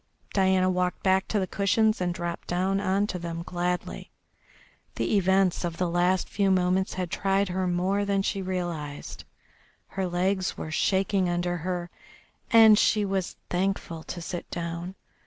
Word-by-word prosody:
Diana 190 -1 +3
walked 180 -1 -1
back 190 0 +2
to 215 - -1
the 190 - +1
cushions 210 +3 +1
and 180 -1 0
dropped 175 -1 -5
down 190 +2 0
on 200 +1 +1
to 185 -3 -4
them 170 0 -5
gladly. 180 0 -3 0.9
The - - 0
events 190 -1 +2
of 170 -1 -3
the 180 - 0
last 175 +2 +1
few 200 -1 +1
moments 185 0 +1
had 180 -2 -3
tried 195 0 +1
her 185 +1 -1
more 185 +3 +1
than 200 -1 0
she 195 0 -1
realised, 175 -6 -5 0.6
her 190 -1 -2
legs 185 +2 0
were 155 - -5
shaking 190 +1 +1
under 175 0 -1
her, 175 +1 -4 0.6
and 220 -2 +7
she 210 -2 +3
was 190 -2 -2 0.2
thankful 180 -3 -1
to 175 - -6
sit 175 0 -6
down. 170 +2 -5
185 Hz, 155 wpm, -27 LUFS, 175-195 Hz, 0.9 s, and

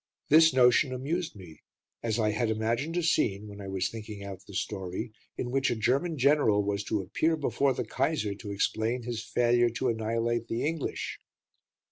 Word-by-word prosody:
This 160 +2 +7
notion 130 +1 +4
amused 160 +6 -2
me, 90 -6 -12 0.4
as 115 -1 -1
I 110 -2 +2
had 115 +2 0
imagined 115 +9 -1
a 175 - +1
scene, 105 -10 +1
when 100 0 -9
I 100 - -7
was 95 -1 -1
thinking 105 -2 -8
out 95 -1 -7
the 100 - -10
story, 95 +3 -4 0.2
in 120 - -3
which 135 0 +2
a - - 0
German 135 +9 +1
general 130 -7 +4
was 100 0 -1
to 105 -2 0
appear 160 - +1
before 140 -2 +1
the - - -2
Kaiser 110 -11 0
to 100 +1 -8
explain 110 +4 0
his 115 -2 -4
failure 120 0 +3
to 125 +2 -1
annihilate 115 +1 -1
the 115 +3 -2
English. 160 -1 -3
115 Hz, 180 wpm, -29 LUFS, 105-135 Hz, 0.4 s, This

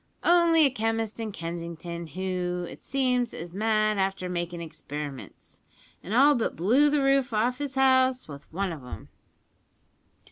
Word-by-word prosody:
"Only 340 -2 +5
a 275 - +3
chemist 225 -2 -2
in 220 -2 -3
Kensington, 170 -1 -6
who, 180 +1 -3
it - - -11
seems, 250 -3 0
is 170 +1 -7
mad 215 0 +1
after 190 -1 -1
makin' 175 -1 -3
experiments, 150 -4 -8 0.4
and 185 - -9
all 275 +6 +6
but 240 -5 -1
blew 245 - +4
the 290 -1 +1
roof 275 -3 +2
off 240 +4 +1
his 285 -2 -4
house 260 -1 +3
with 140 -1 -11
one 190 +3 -2
of 155 -5 -8
'em." 125 - -9
215 Hz, 150 wpm, -27 LUFS, 175-260 Hz, 0.4 s, all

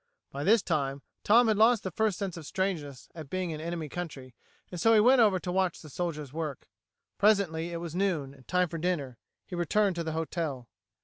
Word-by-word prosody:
By 140 +1 -4
this 215 +4 +4
time 140 -4 -1 0.2
Tom 235 +3 +5
had 215 -2 +2
lost 225 +1 +5
the 190 - -3
first 215 +1 0
sense 195 -4 -3
of 160 -4 -9
strangeness 155 -9 -3
at 155 -4 -9
being 185 0 -2
in 155 - -5
the - - -7
enemy 170 -2 -4
country, 145 -6 -7 0.4
and 175 -2 -5
so 225 0 +5
he - - +6
went 250 +3 +6
over 205 -4 +4
to 180 0 -4
watch 185 -1 0
the 155 - -11
soldiers 150 -6 -4
work. 155 -4 -5 0.5
Presently 190 -6 +2
it 170 - -3
was 170 -1 -6
noon, 175 -8 -1
and 130 -2 -19
time 180 0 +2
for 165 0 -6
dinner. 145 -9 -2 0.3
He - - -12
returned 190 +3 +1
to 170 - -1
the 160 -1 -3
hotel. 160 -6 -3
170 Hz, 215 wpm, -29 LUFS, 150-195 Hz, 0.5 s, he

